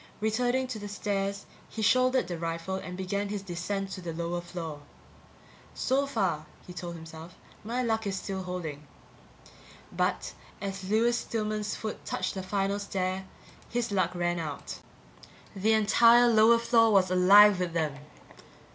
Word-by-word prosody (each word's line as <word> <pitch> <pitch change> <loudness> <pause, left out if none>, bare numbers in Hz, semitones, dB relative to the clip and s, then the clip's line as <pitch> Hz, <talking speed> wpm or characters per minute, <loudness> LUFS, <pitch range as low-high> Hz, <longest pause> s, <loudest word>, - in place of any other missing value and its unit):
Returning 245 +4 +1
to 230 -4 -4
the 205 - -6
stairs, 200 -1 -2 0.2
he 220 - -4
shouldered 255 +3 +3
the 175 -2 -5
rifle 165 +2 -3
and 180 -1 -5
began 200 +2 -2
his 205 -1 -4
descent 195 +2 -4
to 190 - -6
the 170 -2 -5
lower 170 +1 -3
floor. 165 -4 -7 0.9
So 275 +2 +1
far, 185 - -1 0.2
he 180 - -10
told 175 -1 -6
himself, 160 +1 -10 0.3
my 240 +4 -2
luck 220 -2 0
is 195 - -2
still 190 0 -4
holding. 165 -5 -6 1.0
But - - -1 0.3
as 195 -1 -5
Lewis 235 +3 +3
Stillman's 215 -1 -2
foot 215 -1 -6
touched 185 0 -2
the 190 - -4
final 195 +1 -1
stair, 190 -1 -3 0.4
his 235 -2 -2
luck 185 -2 0
ran 175 0 0
out. 150 -3 -6 0.8
The 210 +3 +2
entire 230 +3 +6
lower 225 0 +6
floor 230 -1 +4
was 190 -3 +4
alive 195 +2 +7
with 180 -2 -2
them! 155 -4 -1
195 Hz, 150 wpm, -28 LUFS, 175-220 Hz, 1.0 s, alive